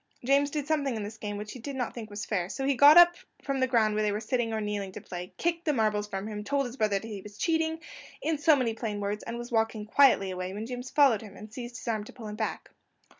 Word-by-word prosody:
James 280 +2 +3
did 295 -1 -3
something 290 -5 0
in 215 - -3
the 210 +2 -6
game 205 -1 -4
which 210 0 -6
he 255 - -9
did 275 +4 -6
not 250 -3 -2
think 225 -3 -7 0.2
fair, 180 -4 -1
so 270 +5 -3
he 280 - +3
got 285 +5 +8
up 345 0 +9 0.3
from 275 -1 -1
the 260 - +2
ground 225 -4 +3
where 215 - 0
they 210 -1 +1
were 205 - -1
sitting 230 +1 -1
or 220 - -1
kneeling 205 -2 -3
to - - -8
play, 180 0 -7
kicked 340 0 -1
the 305 - +1
marbles 215 -4 +1
from 195 -1 -4
him, 210 -1 -5
told 280 +4 0
his 245 0 -6
brother 215 -5 +1
that 220 - -6
he 205 -3 -6
was 210 +1 -12
cheating, 320 +1 0 0.4
in 315 -2 -1
so 300 +1 +6
many 250 -5 0
plain 220 -2 -4
words, 205 +1 -2
and 230 +1 -5
was 240 +1 -7
walking 225 -2 0
quietly 215 -5 +4
away, 185 0 -4
when 210 +2 -5
James 250 +1 -6
followed 270 -8 +4
him, 205 -3 -11
and 215 +1 -11
seized 240 0 -7
his - - -11
arm 220 -2 0
to - - -11
pull 225 -3 -9
him 210 - -6
back. 220 0 -4
225 Hz, 275 wpm, -28 LUFS, 210-275 Hz, 0.4 s, up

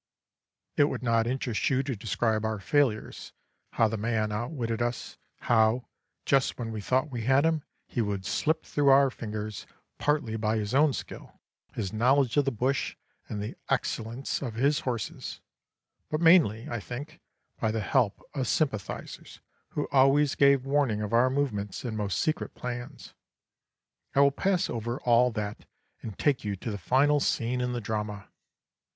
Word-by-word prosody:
"It 145 - +6
would 145 - -3
not 115 -1 +2
interest 125 -3 -1
you 135 -1 +1
to 135 -2 -3
describe 110 +1 -1
our 110 -1 -1
failures 125 -1 0 0.4
how 115 - +3
the 110 +1 -3
man 110 0 0
outwitted 115 0 -3
us; 120 0 -3 0.2
how, 115 +2 +3 0.4
just 135 -2 +2
when 115 -2 -4
we 110 -1 -4
thought 130 +7 0
we 120 -2 -3
had 135 +4 +4
him, 160 -1 +2 0.2
he 120 - -2
would 100 -3 -2
slip 160 +9 0
through 145 -1 0
our 135 0 +6
fingers, 105 -3 -6 0.3
partly 145 -7 0
by 110 0 0
his 105 +1 -3
own 150 +2 +5
skill, - - -8 0.4
his 105 -2 -3
knowledge 125 +2 +3
of 145 -2 +3
the 135 - +1
bush, 130 +4 -1 0.3
and 105 -1 -3
the 105 - -6
excellence 115 +4 -2
of 120 -6 -4
his 140 +5 +2
horses, 120 -5 -4 0.7
but 155 - -1
mainly, 160 - +5
I 120 - -3
think, 145 - -8 0.4
by 110 - +1
the 110 0 -1
help 105 +1 +1
of 135 -3 -2
sympathisers, 120 - -3 0.3
who 150 - -3
always 140 +1 +4
gave 140 -2 +4
warning 135 -7 +1
of 105 +2 -4
our 120 +2 +5
movements 125 -7 -2
and 115 -3 -3
most 105 -3 -1
secret 155 - -1
plans. 120 -1 -7 1.0
I 140 - +6
will 140 0 +6
pass 185 +5 +1
over 120 +2 -3
all 120 +1 +4
that 105 -1 -4 0.4
and 110 -4 -7
take 145 -3 +1
you 105 -2 -2
to 110 +4 -5
the 100 - -5
final 140 - +3
scene 125 -2 0
in 125 0 -1
the 120 - -2
drama. 105 -2 -4
120 Hz, 165 wpm, -28 LUFS, 110-140 Hz, 1.0 s, It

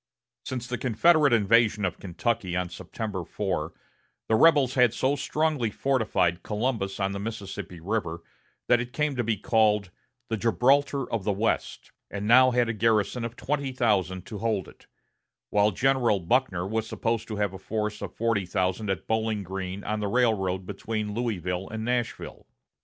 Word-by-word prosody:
Since 125 -2 -4
the 125 0 -4
Confederate 145 +5 +4
invasion 110 -1 +3
of 90 - -3
Kentucky 95 0 -2
on 90 -1 -1
September 100 -2 -5
4, 85 -2 -3 0.6
the - - +2
rebels 145 -1 +5
had 125 -3 +4
so 135 +3 +1
strongly 145 -3 0
fortified 105 -8 0
Columbus 105 -3 -2
on 100 0 0
the 100 - -4
Mississippi 100 -4 -6
River 85 -3 -3 0.4
that 120 -1 +5
it 125 +1 -7
came 150 0 0
to 120 - 0
be 110 -1 0
called 105 -2 +2 0.4
the 115 - -2
"Gibraltar 135 +5 +2
of 110 -4 -1
the 105 - +1
West," 105 +3 -2 0.2
and 100 +1 -4
now 130 +3 +7
had 125 -1 +2
a 115 - -1
garrison 115 +2 +1
of 115 0 -5
twenty 140 0 -2
thousand 95 -7 0
to 105 - -7
hold 110 -4 -1
it; - - -17 0.6
while 105 0 +4
General 120 -1 +2
Buckner 90 0 +1
was 110 +2 -2
supposed 115 0 -2
to 110 - -4
have 105 -2 -1
a 95 - -8
force 105 +1 -3
of - - -5
forty 115 -5 0
thousand 95 +2 -1
at 95 -4 -2
Bowling 110 -2 -1
Green 95 +1 -5
on 105 +1 -2
the 105 - -1
railroad 100 -6 +1
between 105 +2 -4
Louisville 95 -6 -2
and 110 0 -4
Nashville. 120 -1 -3
110 Hz, 170 wpm, -27 LUFS, 95-120 Hz, 0.6 s, now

